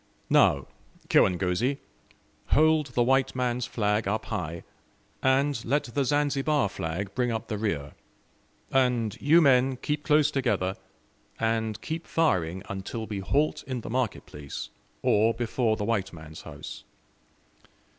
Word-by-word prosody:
"Now, - - +4 0.4
kirangozi, 95 +9 +2 0.7
hold 155 0 +4
the 125 -2 +1
white 130 +2 +2
man's 125 -1 -1
flag 105 -1 0
up 110 +2 -1
high, 85 -1 -4 0.6
and 135 -1 +2
let 145 +5 +1
the 135 +4 -1
Zanzibar 145 -2 +1
flag 95 +2 -4
bring 125 -2 0
up 110 0 -4
the 105 - -2
rear. 75 -10 -2 0.8
And 125 -5 +2
you 160 +4 +6
men 130 -2 +4
keep 150 +3 -2
close 150 0 +4
together, 120 -9 0 0.6
and 110 -1 0
keep 160 +1 -5
firing 95 - +1
until 100 +4 -5
we 105 -2 -4
halt 145 +10 0
in 130 -3 -3
the - - -7
market 125 -3 -1
place, 75 -2 -7 0.3
or 110 +2 +3
before 115 -1 0
the 105 - -2
white 100 -4 0
man's 80 -2 -10
house. - - -9
120 Hz, 135 wpm, -27 LUFS, 100-135 Hz, 0.8 s, you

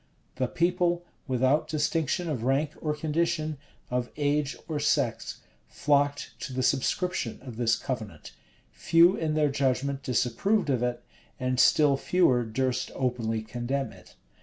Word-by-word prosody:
[] - - -39
The 130 -1 +1
people, 175 +2 +1 0.2
without 130 +3 +2
distinction 160 +2 0
of 145 -8 -2
rank 135 +5 +1
or 150 -1 -1
condition, 155 -1 -1 0.3
of 125 -1 -1
age 145 -1 0
or 155 -2 -2
sex, 145 - 0 0.3
flocked 145 0 +1
to 140 - -6
the 130 0 -1
subscription 140 +1 0
of 125 -4 -8
this 115 -1 +2
covenant: 115 -6 -6 0.4
few 170 +3 +4
in 155 -4 -1
their 150 -1 +3
judgment 135 0 0
disapproved 140 - +1
of 125 -3 0
it; 120 0 -2 0.4
and 130 0 -1
still 145 -1 +5
fewer 135 -6 +3
durst 125 +3 -1
openly 115 -4 -1
condemn 125 +4 -3
it. - - -17
140 Hz, 140 wpm, -27 LUFS, 125-155 Hz, 0.4 s, still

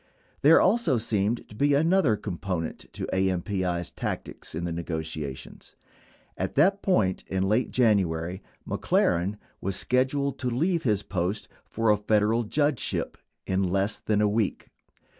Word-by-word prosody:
There 150 +4 +7
also 210 - +3
seemed 110 0 -1
to - - -14
be 140 +6 +2
another 160 - +3
component 90 -3 -4
to - - -4
AMPI's 95 -2 -1
tactics - - -5
in 85 - -3
the 85 - -2
negotiations. 80 -4 -6 0.6
At - - -3
that 195 +8 +4
point 100 - +1
in 95 0 0
late 110 +5 +1
January, 95 -7 +1 0.3
McLaren 90 +4 +1 0.2
was 95 0 -2
sched 130 +4 +1
uled 140 -1 -2
to 125 - -1
leave 165 +8 +1
his 105 -5 +1
post 95 +2 -2 0.2
for 115 -1 +1
a 105 - +3
Federal 105 +2 +2
judgeship 145 +2 -1 0.3
in 95 0 0
less 100 +3 0
than 105 -1 0
a 105 - +4
week. 105 -1 -1
105 Hz, 140 wpm, -27 LUFS, 95-125 Hz, 0.6 s, There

